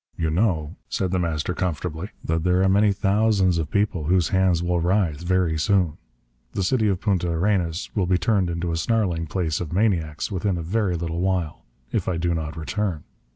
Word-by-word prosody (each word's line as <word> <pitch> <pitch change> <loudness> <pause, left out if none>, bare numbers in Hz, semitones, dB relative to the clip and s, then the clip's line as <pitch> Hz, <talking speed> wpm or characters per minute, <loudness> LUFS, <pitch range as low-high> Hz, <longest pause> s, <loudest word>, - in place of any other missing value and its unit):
"You 80 -2 0
know," 85 -3 0
said 95 -2 -1
The 95 - +1
Master 85 0 -1
comfortably, 90 +1 -3 0.2
"that 80 0 0
there 90 +1 +3
are - - +4
many 100 +2 +4
thousands 100 -3 +2
of 80 -2 -3
people 100 -5 0
whose 90 0 +2
hands 95 -3 +2
will 90 0 +1
writhe, 85 -3 +1
very 85 -3 +1
soon. 90 -3 +1 0.5
The 100 - -1
city 110 +3 +2
of 95 -3 +1
Punta 95 -5 0
Arenas 85 0 0
will 95 -4 0
be 90 0 +3
turned 95 0 +1
into 85 0 -2
a 80 - -1
snarling 85 -4 0
place 80 0 -1
of 85 - -5
maniacs 85 -5 0
within 95 -1 -1
a 85 - -4
very 95 +1 0
little 85 0 -3
while 90 -4 -1 0.3
if - - -1
I 90 - 0
do 85 +1 0
not 80 -2 -4
return. 85 0 -2
90 Hz, 195 wpm, -24 LUFS, 80-95 Hz, 0.5 s, are